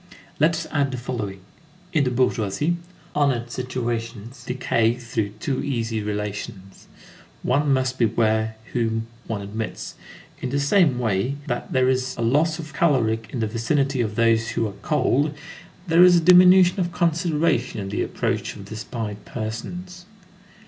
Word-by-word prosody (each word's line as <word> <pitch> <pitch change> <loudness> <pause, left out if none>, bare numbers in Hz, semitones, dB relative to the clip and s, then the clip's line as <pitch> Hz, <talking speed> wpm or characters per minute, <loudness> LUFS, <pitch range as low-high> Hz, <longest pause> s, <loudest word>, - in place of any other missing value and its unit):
Let 160 +3 +4
us 165 0 -3
add 140 -2 +1
the 130 - -4
following: 110 -6 -4 0.5
in 150 -4 +3
the - - +2
bourgeoisie, 125 - 0 0.4
honored 125 -5 +1
situations 120 -1 -4
decay 120 -2 +1
through 115 -4 -3
too 130 +3 -2
easy 115 -5 -2
relations; 105 -1 -5 0.6
one 140 +3 +2
must 130 -1 +1
beware 110 -1 +1 0.2
whom 115 -1 0 0.2
one 105 -3 -3
admits; 110 +3 -5 0.5
in 130 - -3
the 140 +2 0
same 145 -2 +3
way 115 +2 0
that 120 -4 -4
there 130 -1 +3
is 130 0 0
a - - -1
loss 150 +7 +2
of 155 -3 -8
caloric 115 -10 +1
in 125 - -3
the - - +2
vicinity 135 +4 0
of 110 -2 -2
those 115 -1 +3
who 115 - -1
are 100 - -7
cold, 145 0 +1 0.5
there 170 0 +6
is 180 -1 +7
a - - +5
diminution 180 +2 +7
of 175 -1 0
consideration 165 - +1
in 100 -1 -4
the 100 - -2
approach - - -2
of - - -10
despised 110 -2 -6
persons. 180 - -6
125 Hz, 150 wpm, -23 LUFS, 110-150 Hz, 0.6 s, is